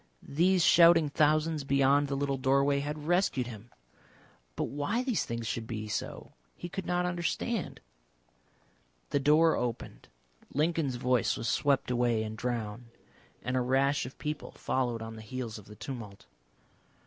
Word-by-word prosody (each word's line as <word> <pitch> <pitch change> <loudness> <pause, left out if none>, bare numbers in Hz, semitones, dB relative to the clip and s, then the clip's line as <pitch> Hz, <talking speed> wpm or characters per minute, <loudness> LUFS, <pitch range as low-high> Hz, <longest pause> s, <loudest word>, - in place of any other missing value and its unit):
These 175 +4 +2
shouting 165 -1 +6
thousands 155 +1 +2
beyond 140 +1 +3
the 140 - -2
little 140 -1 -1
doorway 140 +1 +3
had 150 +1 -4
rescued 175 -7 +1
him. 115 -1 -10 0.9
But - - -1
why 145 - -1
these 250 -5 0
things 115 0 -4
should 110 +1 -3
be 110 -2 -4
so 105 - -5 0.2
he 175 - -7
could 190 +1 -5
not 180 0 +1
understand. 180 +5 -2 1.3
The 145 - +2
door 155 +3 +4
opened, 120 -2 -4 0.5
Lincoln's 155 -3 +1
voice 125 -1 +1
was 115 - -3
swept 135 +2 +1
away 120 -2 +1
and 110 0 -5
drowned, 115 -1 -4 0.6
and 125 - -2
a 130 - +2
rash 135 +2 +1
of 130 - -12
people 150 0 -4
followed 120 -3 -1
on 110 0 -8
the - - -8
heels 115 -1 -6
of 100 - -15
the 105 - -12
tumult. 110 -6 -8
135 Hz, 150 wpm, -30 LUFS, 120-155 Hz, 1.3 s, shouting